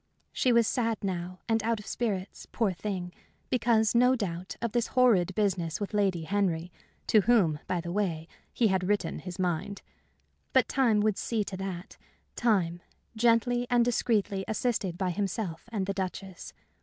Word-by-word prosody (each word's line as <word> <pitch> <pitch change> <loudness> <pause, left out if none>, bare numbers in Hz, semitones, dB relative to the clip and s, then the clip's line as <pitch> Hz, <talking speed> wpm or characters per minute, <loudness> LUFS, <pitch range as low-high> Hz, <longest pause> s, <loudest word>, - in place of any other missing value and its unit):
She 255 - +2
was 235 -1 +5
sad 230 -2 -1
now 180 -1 -4
and 225 -1 +2
out 225 0 0
of 210 - -11
spirits, 200 -5 -3
poor 220 -5 +1
thing, 180 -1 -4 0.4
because, 225 -3 +3
no 250 +2 +5
doubt, 185 -5 -4
of 235 -2 -2
this 240 0 0
horrid 195 -8 +4
business 185 -6 0
with 205 0 -4
Lady 195 -5 +1
Henry, 180 -2 -1 0.3
to 215 - +5
whom, 190 -9 +3
by 180 -2 -1
the 170 0 -5
way, 175 -5 -1 0.2
he 230 -3 +2
had 185 -1 0
written 205 0 0
his 180 -2 -7
mind. 185 +2 -2 0.7
But - - +4
time 235 -6 +2
would 210 -2 +1
see 225 -3 -1
to 195 -1 -6
that 190 +1 -6 0.4
time 180 -7 +1 0.3
gently 240 +2 +2
and 240 -1 +4
discreetly 210 -5 +1
assisted 210 -5 -1
by 185 -1 0
himself 195 0 -3
and 205 -4 -1
the 195 - -2
Duchess. 190 -1 -5
200 Hz, 165 wpm, -29 LUFS, 180-230 Hz, 0.7 s, was